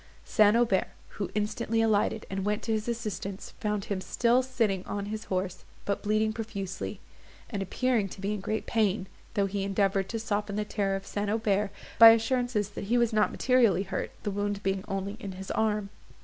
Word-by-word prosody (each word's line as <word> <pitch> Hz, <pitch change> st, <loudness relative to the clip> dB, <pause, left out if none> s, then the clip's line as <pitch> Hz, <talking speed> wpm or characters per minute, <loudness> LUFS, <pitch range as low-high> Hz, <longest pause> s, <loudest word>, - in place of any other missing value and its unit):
St. 215 Hz, 0 st, +5 dB
Aubert, 230 Hz, -5 st, +2 dB, 0.2 s
who 200 Hz, -, -4 dB
instantly 215 Hz, +2 st, 0 dB
alighted 220 Hz, -1 st, +2 dB
and 195 Hz, 0 st, -3 dB
went 210 Hz, +1 st, -1 dB
to 225 Hz, -, -2 dB
his 215 Hz, 0 st, -1 dB
assistance, 215 Hz, -4 st, -4 dB
found 210 Hz, -2 st, -1 dB
him 195 Hz, -2 st, -2 dB
still 240 Hz, +6 st, +2 dB
sitting 230 Hz, -8 st, 0 dB
on 200 Hz, -1 st, -3 dB
his 215 Hz, +1 st, -5 dB
horse, 185 Hz, -1 st, -2 dB, 0.2 s
but 200 Hz, -, -1 dB
bleeding 215 Hz, +1 st, +1 dB
profusely, 200 Hz, -4 st, -5 dB, 0.5 s
and 205 Hz, -4 st, -2 dB
appearing 225 Hz, +1 st, 0 dB
to 190 Hz, -, -10 dB
be 200 Hz, +2 st, -1 dB
in 210 Hz, -, -3 dB
great 215 Hz, +3 st, -2 dB
pain, 210 Hz, -4 st, +1 dB, 0.3 s
though 200 Hz, -2 st, +3 dB
he 195 Hz, +1 st, -2 dB
endeavoured 195 Hz, -1 st, +1 dB
to 230 Hz, -, -2 dB
soften 210 Hz, -2 st, -2 dB
the 210 Hz, 0 st, -1 dB
terror 200 Hz, -2 st, 0 dB
of 195 Hz, 0 st, -5 dB
St. 205 Hz, 0 st, -2 dB
Aubert 210 Hz, -2 st, +1 dB, 0.3 s
by 230 Hz, 0 st, +12 dB
assurances 225 Hz, -2 st, +2 dB
that 205 Hz, -, -6 dB
he 235 Hz, +5 st, +2 dB
was 235 Hz, -1 st, +2 dB
not 215 Hz, -1 st, +3 dB
materially 235 Hz, -7 st, +3 dB
hurt, 195 Hz, -, -3 dB
the 205 Hz, -, -1 dB
wound 205 Hz, 0 st, -2 dB
being 195 Hz, 0 st, 0 dB
only 195 Hz, +2 st, -3 dB
in 200 Hz, -5 st, -6 dB
his 190 Hz, +1 st, -7 dB
arm. 210 Hz, -2 st, 0 dB
210 Hz, 190 wpm, -29 LUFS, 195-220 Hz, 0.5 s, by